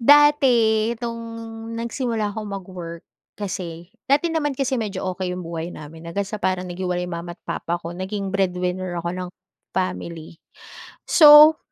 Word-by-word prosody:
Dati, 245 -5 +5
itong 230 0 -4 0.6
nagsimula 230 -3 -2
akong 215 -1 -5
mag-work 180 -4 -7 0.3
kasi- 175 -4 -5 0.2
dati 290 +5 +3
naman 295 -4 0
kasi 270 -1 0
medyo 200 -4 -3
okey 180 0 -3
yung 180 - -6
buhay 165 0 -4
namin, 160 +2 -10
hanggang 200 +4 -1
sa 205 +1 -6
parang 185 -3 0
naghiwalay 180 0 -2
mama't 170 0 -6
papa 170 - -2
ko- 170 0 -6
naging 195 +1 -4
breadwinner 180 -1 -1
ako 170 0 -3
ng 180 0 -4 0.5
family. 155 - -3 0.7
So, 300 0 +9
190 Hz, 140 wpm, -23 LUFS, 175-230 Hz, 0.7 s, So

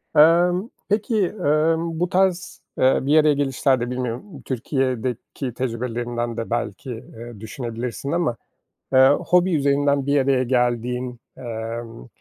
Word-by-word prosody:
Emm, 175 +4 +5 0.3
peki, 210 0 +1
emm, 165 -2 0
bu 180 +1 0
tarz, 185 -1 0 0.2
eee, 130 +1 +4
bir 145 +4 +3
araya 150 -1 +4
gelişlerde, 135 -3 +1
bilmiyorum, 125 -2 -3 0.2
Türkiye'deki 130 -1 -2
tecrübelerinden 120 -1 -3
de 115 - -4
belki, 115 +1 -3
eee, 115 -1 -9
düşünebilirsin. 120 +4 -5
Ama, 165 -8 0 0.6
eee, 130 0 +7
hobi 175 +5 +3
üzerinden 140 -1 +2
bir 140 0 +3
araya 135 -1 +2
geldiğin, 125 0 -1 0.2
emm, 115 - -6
130 Hz, 120 wpm, -22 LUFS, 120-155 Hz, 0.6 s, eee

